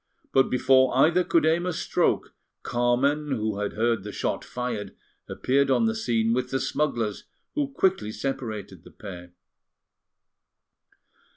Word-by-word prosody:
But 135 0 +4
before 130 0 +3
either 165 +6 +4
could 165 -2 +2
aim 165 +3 +2
a - - 0
stroke, - - 0 0.3
Carmen, 135 +5 +1
who 110 -4 -2
had 105 0 -2
heard 115 0 +1
the 105 +2 -7
shot - - -2
fired, 115 -5 -5 0.3
appeared 135 +2 +1
on 180 +12 +3
the 225 - +1
scene 115 - 0
with 125 +1 -1
the 135 - -1
smugglers, 120 -10 -1 0.3
who 295 -2 0
quickly 190 - 0
separated 120 -5 -5
the - - -14
pair. 90 -3 -10
130 Hz, 135 wpm, -26 LUFS, 110-150 Hz, 0.3 s, But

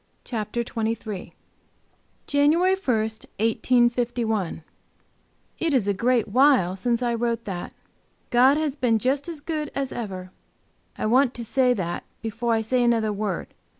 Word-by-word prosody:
Chapter 225 0 -3
23 225 -2 -3
XXIII. - - -21 0.9
JANUARY 315 +6 +3
1, 380 -11 0
1851 225 -2 0 1.0
IT 330 -3 0
is 220 -6 +2
a 200 - +2
great 235 +3 +1
while 245 -6 +4
since 235 +5 0
I 240 -1 +1
wrote 235 0 -1
that. 180 -3 -5 0.6
"God 255 +4 +5
has 305 -3 -1
been 245 -6 +2
just 270 - 0
as 320 -3 -6
good 305 -1 -3
as 275 -2 -2
ever"; 185 -5 -6 0.7
I - - -2
want 250 +3 +3
to 235 - -5
say 250 +1 +2
that 175 -4 -3 0.2
before 225 +2 -2
I 225 - +2
say 245 +3 +1
another 225 -3 +2
word. 200 -3 -3
235 Hz, 145 wpm, -24 LUFS, 220-260 Hz, 1.0 s, God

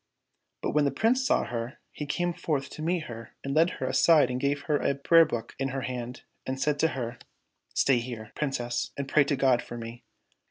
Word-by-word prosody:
But - - 0
when 150 -1 +3
the - - +3
Prince 240 - +2
saw - - +2
her, 120 +2 -4
he 150 - -6
came 175 +4 0
forth 155 -5 -2
to - - -8
meet 170 +1 0
her 115 -4 -9
and 140 - -2
led 165 +3 +4
her - - -3
aside 155 -6 +4
and 125 - -2
gave 140 +1 0
her 150 0 +1
a 140 - 0
prayer 165 +4 +6
book 120 -6 -5
in 135 - 0
her 135 0 -3
hand, 125 -1 -5 0.2
and 130 0 -4
said 145 +1 +1
to 160 - +4
her, 120 -1 -4 0.3
" - - -52
Stay 130 -3 +4
here, 115 -3 -7
Princess, 120 -4 -2
and 140 -1 -3
pray 145 +1 +5
to 145 - +1
God 130 -3 +3
for 120 - -8
me." 115 +1 -8
135 Hz, 225 wpm, -28 LUFS, 120-150 Hz, 0.3 s, prayer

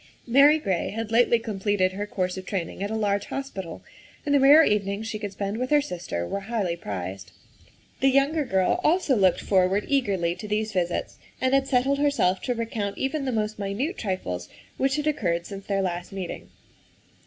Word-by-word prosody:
Mary 280 +5 +6
Gray 195 - -1
had 225 0 -4
lately 235 +1 +4
completed 205 -4 0
her 205 +2 -4
course 185 -3 -2
of 190 - -6
training 185 -2 -4
at 200 - -2
a 220 - -2
large 205 -2 0
hos 275 0 -5
pital, 190 -4 -7 0.4
and 290 - +1
the 285 - +5
rare 285 +4 +8
evenings 205 -2 0
she 220 -1 -4
could 205 -2 -4
spend 200 +1 -3
with 255 +1 -2
her 295 - +5
sister 175 - -4
were 200 - -2
highly 200 -4 -2
prized. 95 - -6 0.7
The 270 - +4
younger 280 +4 +2
girl 190 -8 +1
also 315 -4 +3
looked 190 -5 +3
forward 190 +1 +2
eagerly 200 -12 +1
to 210 - -7
these 215 +1 -1
visits 175 -2 -2 0.2
and 260 +1 +1
had 275 0 +3
settled 270 +2 +2
herself 280 -11 +2
to 245 - 0
recount 225 -3 -3
even 275 +1 -2
the 260 - 0
most 215 -2 -2
minute 210 - -2
trifles 90 - -3 0.3
which 270 0 +1
had 300 -1 -2
occurred 170 - 0
since 195 0 -8
their 195 -1 0
last 175 -1 -3
meeting. 190 -3 -6
210 Hz, 190 wpm, -25 LUFS, 190-265 Hz, 0.7 s, rare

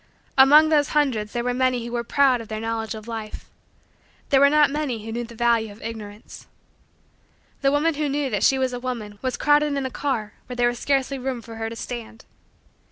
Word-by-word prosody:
Among 295 +4 +7
those 300 -2 +3
hundreds 230 -8 +1
there 240 - -2
were 245 0 0
many 255 -1 0
who 235 - -6
were 240 -1 -2
proud 260 0 +3
of 225 - -10
their 215 0 -5
knowledge 225 0 -3
of 215 +1 -10
life. 225 -2 -6 0.8
There 275 - +5
were 280 +1 +6
not 300 -1 +4
many 270 -7 -3
who 225 - -5
knew 240 +1 -3
the 235 0 -13
value 230 -2 +1
of 205 - -14
Ignorance. 215 -2 -9 1.1
The 275 -1 +3
woman 300 +3 +2
who 295 0 -2
knew 280 -1 -1
that 205 - -1
she 270 - +4
was 260 -1 0
a 245 - -4
woman 230 -5 -5
was 255 -2 -2
crowded 295 -1 +3
in 275 - -2
a 260 - -3
car 230 -8 -3
where 250 - -6
there 240 0 +3
was 240 -1 -5
scarcely 275 -1 0
room 255 -1 -3
for 230 -1 -11
her 225 0 -3
to 230 - -8
stand. 230 -1 -7
245 Hz, 220 wpm, -23 LUFS, 225-275 Hz, 1.1 s, Among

